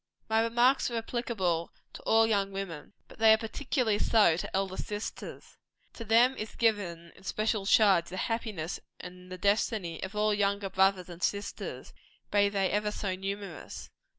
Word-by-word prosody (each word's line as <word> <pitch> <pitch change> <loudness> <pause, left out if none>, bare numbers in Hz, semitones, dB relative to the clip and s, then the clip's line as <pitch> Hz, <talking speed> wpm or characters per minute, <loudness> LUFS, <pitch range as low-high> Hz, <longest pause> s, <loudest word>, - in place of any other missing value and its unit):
My 220 0 +2
remarks 240 +4 +3
are 235 - -3
applicable 220 -8 -2 0.2
to - - -9
all 225 0 +5
young 200 -3 +1
women; 195 -4 -6
but - - -16
they 220 0 +7
are - - +4
particularly 225 -1 -1
so 210 -8 +4
to 175 - -5
elder 190 -1 -1
sisters. 210 +2 -7 0.3
To 230 - -8
them 235 +4 +4
is 215 - -6
given 180 -7 0
in - - -18
special 215 0 -1
charge, 195 -6 +5
the 185 - -8
happiness 215 -7 -3 0.2
and 180 0 -11
the 185 - -5
destiny 200 -3 0
of 190 +2 -6
all 210 0 +2
younger 200 -1 0
brothers 190 -1 +2
and 175 -1 -10
sisters, 200 0 -3 0.4
be 205 -1 +4
they 195 -2 0
ever 210 0 0
so 200 -2 -3
numerous. 195 -2 -6
205 Hz, 165 wpm, -30 LUFS, 185-225 Hz, 0.4 s, they